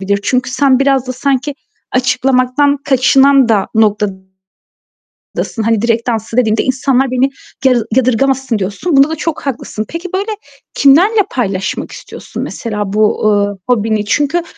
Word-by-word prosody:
Bir 195 - -7
de 200 - +3
çünkü 250 +3 0
sen 260 0 +2
biraz 270 -2 +1
da 255 - -3
sanki 275 +2 -1 0.4
açıklamaktan 255 +2 +1
kaçınan 270 0 +4
da 210 -3 +1
noktadasın. 190 -3 -1 1.2
Hani 225 -1 +1
direkt 235 0 0
danslı 225 -1 -3
dediğimde 220 -3 +2
insanlar 260 0 0
beni 255 +2 +1 0.4
ya 260 - +5 0.2
yadırgamasın 260 -1 +1
diyorsun. 205 - -1
Bunda 275 +2 +5
da 320 - -2
çok 320 0 -4
haklısın. 230 -5 -4
Peki, 335 +2 -6
böyle, 405 +3 -2 0.4
kimlerle 360 +11 +4
paylaşmak 195 -6 -3
istiyorsun - - -8
mesela 210 -4 -4
bu, 215 0 +1 0.3
eee, - - -24
hobini? 220 -3 +1
Çünkü 295 +9 0
255 Hz, 140 wpm, -14 LUFS, 220-275 Hz, 1.2 s, ya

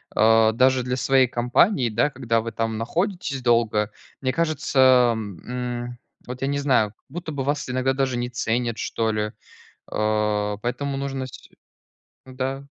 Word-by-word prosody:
а 110 0 +5
даже 130 +2 +3
для 125 +1 -1
своей 130 0 +3
компании, 125 - +2
да, 115 +6 +1
когда 115 -5 0
вы 115 +1 -5
там 115 0 -2
находитесь 165 - -2
долго. 115 -3 +2 0.3
Мне 130 -1 +1
кажется, 130 -6 +4
м, 120 +4 -5 0.3
вот, 125 +1 -7
я 135 - 0
не 140 0 0
знаю, 130 -7 +2
как 110 - -37
будто 170 -1 -6
бы 140 -3 -3
вас 145 +1 -1
иногда 130 +1 +1
даже 130 -2 0
не 120 0 -2
ценят, 120 -1 -1
что 115 -1 -1
ли. 105 0 -2 0.6
Э, 105 -1 0
поэтому 135 +3 -2
нужно 135 -1 -3
сь 130 - -13 0.8
м-да. 130 +1 -4
125 Hz, 155 wpm, -23 LUFS, 115-135 Hz, 0.8 s, а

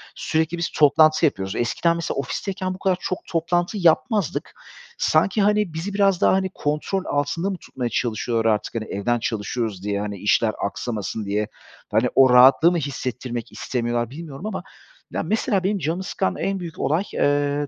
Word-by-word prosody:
sürekli 160 +2 -1
biz 170 - -1
toplantı 155 +2 +4
yapıyoruz. 95 -8 -1
Eskiden 165 +8 +1
mesela 170 - -3
ofisteyken 185 +5 -3
bu 185 - -10
kadar 185 -2 +1
çok 185 - -2
toplantı 175 +4 0
yapmazdık. 195 +3 +1 0.4
Sanki, 180 +7 +2
hani, 210 -4 +2
bizi 180 +5 -4
biraz 195 -2 +2
daha - - +5
hani, 190 0 +1
kontrol 150 +6 -2
altında 145 +6 -1
mı 190 - -3
tutmaya 125 -6 -5
çalışıyorlar 115 0 0
artık, 105 - -4
hani, 110 -1 -2
evden 120 +5 -1
çalışıyoruz 110 -2 -3
diye, 100 -1 -1
hani, 105 -1 -4
işler 110 +3 +2
aksamasın 105 0 -4
diye, 105 +1 -1 0.4
hani, 110 +4 +3
o 135 -1 +7
rahatlığı 130 +7 +7
mı 175 - 0
hissettirmek 125 -4 -4
istemiyorlar 120 -2 -2
bilmiyorum 155 +3 -8
ama 215 - -4 0.5
ya, - - -2
mesela 215 -3 0
benim 200 +2 +1
canımı 165 +3 -2
sıkan 95 - -1
en 195 -1 -1
büyük 170 -2 -8
olay, 160 +6 +1
eee, 145 0 +1
145 Hz, 165 wpm, -23 LUFS, 120-180 Hz, 0.5 s, o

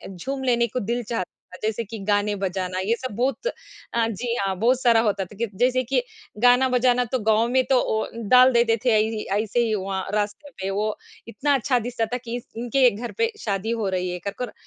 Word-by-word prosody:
झूम 265 +9 -4
लेने 235 -2 +2
को 250 - -3
दिल 235 +3 -2
चाहता, 185 -4 -6
जैसे 220 +1 -1
कि 225 +2 -8
गाने 205 0 +1
बजाना 185 -1 -2
ये 215 +5 +1
सब 255 -5 -5
बहुत 260 - -1 0.5
हाँ, 230 -1 +2
जी 235 +3 -3
हाँ, 195 -1 -1
बहुत 250 +3 +3
सारा 235 -2 +5
होता 200 -2 0
था 200 - -15
कि 235 0 -1
जैसे 255 +1 +2
कि 255 +1 +1 0.4
गाना 250 +1 +6
बजाना 250 0 +3
तो 255 - +1
गाँव 220 +1 +4
में 260 +1 +3
तो 260 -2 +5
ओ 220 0 0 0.2
डाल 255 +1 +7
देते 235 -1 +3
थे 225 -3 +5
इ 220 0 -1
ऐसे 215 +2 0
ही 220 -1 0
वहाँ 190 -1 -3
रास्ते 210 +7 -2
पे। 190 - -2
वो 210 +2 -1 0.3
इतना 285 +5 0
अच्छा 255 -1 +1
दिखता 235 0 -2
था 245 - +1
कि 235 0 -4
इस 245 - -10
इनके 245 +2 +3
घर 235 +4 -6
पे 460 0 +1
शादी 205 +1 -1
हो 225 -4 -1
रही 185 -1 -1
है 180 - -4
करकर 210 +5 -4
230 Hz, 215 wpm, -24 LUFS, 205-250 Hz, 0.5 s, डाल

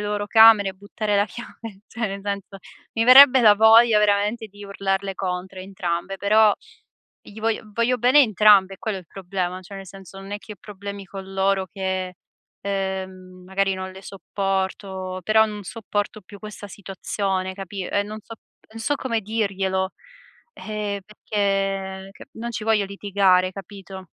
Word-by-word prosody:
loro 205 0 -2
camere? 220 -3 +6
Buttare 205 +2 -4
la 205 - +2
chiave? 220 -1 -10
Cioè, 230 -1 -3
nel 195 0 -5
senso, 200 -1 -5 0.4
mi 225 0 +1
verrebbe 260 +1 +9
la 210 -2 +7
voglia, 220 +1 +6
veramente, 210 +2 +1
di 205 0 -13
urlarle 195 0 -2
contro, 185 0 -4
a - - -6
entrambe, 190 0 -4
però 210 +1 +4 0.7
gli 215 +1 -13
voglio 225 0 -1
voglio 235 +3 +1
bene 255 +5 +6
entrambe, 205 -4 +5
è - - -18
quello 215 -3 -3
il 180 - -14
problema 185 0 -4
cioè, 190 +2 -12
nel 195 0 -9
senso, 195 +1 -12
non 195 +1 -9
è 205 - -3
che 210 - -11
ho - - -13
problemi 200 -1 -8
con 195 0 -9
loro 195 0 +1
che, 185 0 -4 0.5
ehm, 190 -2 -5
magari 195 0 0
non 190 0 -6
le 190 - -11
sopporto, 190 -1 -4
però 220 +3 +4
non 210 -1 -7
sopporto 205 -1 -4
più 200 +2 -13
questa 210 0 -9
situazione, 190 -1 -3
capi 195 0 -6
e 205 - 0
non 215 +1 -8
so 225 - -10 0.4
non 225 +1 -10
so 290 +5 0
come 230 -5 -2
dirglielo, 195 -3 -1 0.6
ehm, 210 -1 -4
perché 195 -2 -2
che - - -13
non 235 +1 -6
ci 215 -2 -5
voglio 220 -2 +2
litigare, 195 -2 +2
capito? 195 0 -10
200 Hz, 165 wpm, -23 LUFS, 190-215 Hz, 0.7 s, verrebbe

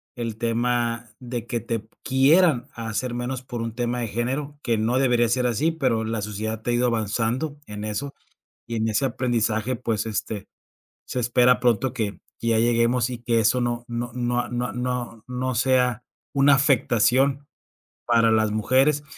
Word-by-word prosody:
el 115 -3 -4
tema 120 0 0
de 120 -2 -5
que 120 +1 -2
te 115 +1 -3
p 110 - -25 0.2
quieran 135 +1 +4
hacer 115 +2 -3
menos 120 +1 -3
por 120 -2 -5
un 115 -1 -4
tema 120 0 -1
de 115 - -2
género, 135 +6 -3
que 115 -3 +1
no 115 +4 +1
debería 120 -3 +3
ser 125 +2 +1
así, 140 +8 +1
pero 130 -8 0
la 110 -2 -2
sociedad 110 +1 -4
ha 120 - +1
ido 120 +1 +2
avanzando 115 +6 -1
en 105 0 -7
eso 110 +7 -4 0.5
y 115 - -4
en 110 0 0
ese 110 +5 +1
aprendizaje, 120 -1 0
pues, 115 -3 -2
este, 110 -1 -3 0.6
se - - -4
espera 125 +1 +4
pronto 120 +1 +2
que 110 -4 -3 0.2
que 115 - -2
ya 115 -1 +3
lleguemos 120 +1 +2
y 125 - -5
que 115 -1 +1
eso 115 +3 +3
no 120 0 -2
no 120 0 -4
no 120 0 0
a - - -8
no 120 -3 -2
no 125 -2 -4
no 125 0 -2
sea 125 -1 +2 0.3
una 140 0 +5
afectación 135 +1 +3 0.6
para 115 -1 +4
las 110 -1 +2
mujeres. 130 +7 +2
120 Hz, 175 wpm, -24 LUFS, 115-125 Hz, 0.6 s, una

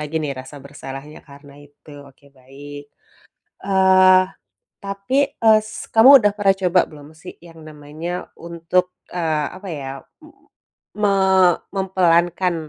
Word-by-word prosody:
lagi 150 +1 -7
nih 145 -2 -3
rasa 130 +3 -13
bersalahnya, 140 +1 -10
karena 140 0 -16
itu, 145 +1 -20 0.2
oke 135 +1 -25
baik. 140 +3 -12 0.8
Eee, 190 -1 +4 0.6
tapi, 200 +6 -5 0.3
eee, 220 -1 +6
s 215 - -9
kamu 225 +4 +7
sudah 205 -3 +1
pernah 195 -1 +2
coba 180 +1 +3
belum 145 -2 -14 0.2
sih, - - -9
yang 165 -1 -16
namanya 150 +3 -9 0.3
untuk, 170 +2 -2 0.3
eee, 160 -4 -1
apa 195 +1 -11
ya, 140 -3 -6 0.3
m - - -16 0.7
me 205 - +2 0.7
mempelankan 180 -2 +1
170 Hz, 130 wpm, -19 LUFS, 145-190 Hz, 0.8 s, kamu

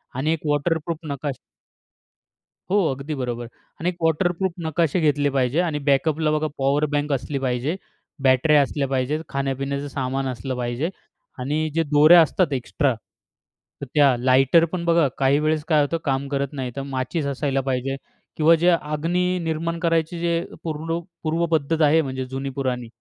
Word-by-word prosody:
आणि 150 +5 +1
एक 165 - -3
वॉटरप्रूफ 155 +2 0
नकाशा. 140 -2 -4 1.3
हो. 200 - +3 0.2
अगदी 140 +3 -5
बरोबर 120 -3 -3
आहे. 115 - -9 0.3
आणि 175 - +1
1 180 - -5
वॉटरप्रूफ 175 +3 +1
नकाशे 160 +1 +1
घेतले 145 -2 +2
पाहिजे 135 +2 +1
आणि 160 -4 -1
बॅकअपला 155 +2 +2
बघा 155 0 0
पॉवर 140 +2 +2
बँक 145 0 -1
असली 140 +1 -2
पाहिजे. 130 +4 -1 0.5
बॅटऱ्या 135 +3 +5
असल्या 140 0 -1
पाहिजेत, 135 +3 -1
खाण्यापिण्याचं 140 +1 -2
सामान 135 0 -2
असलं 130 +1 -4
पाहिजे 125 +6 -2 0.5
आणि 150 +5 -1
जे 165 - +3
दोऱ्या 155 +3 +7
असतात 165 0 +1
एक्स्ट्रा 135 +2 0 0.9
तर - - -3
त्या 140 -4 +5
लाइटर 135 +6 +4
पण 180 -2 -3
बघा 170 -3 +4
काही 140 +1 +3
वेळेस 155 0 0
काय 155 -3 +4
होतं 145 +3 0
काम 135 -1 0
करत 140 0 0
नाही, 130 -3 -4
तर 140 - -3
माचीस 135 +3 -2
असायला 140 0 -1
पाहिजे 135 0 -2 0.4
किंवा 160 +2 +6
जे 170 +2 +3
अग्नी 170 +3 0
निर्माण 165 +1 -2
करायची 165 0 0
जे 170 0 0 0.2
पूरलू 165 +1 -3 0.2
पूर्व 165 +2 0
पद्धत 160 +1 +1
आहे 155 +2 +5
म्हणजे 130 -3 -4
जुनी 135 +2 -4
पुराणी, 125 -3 -2
145 Hz, 160 wpm, -23 LUFS, 135-165 Hz, 1.3 s, दोऱ्या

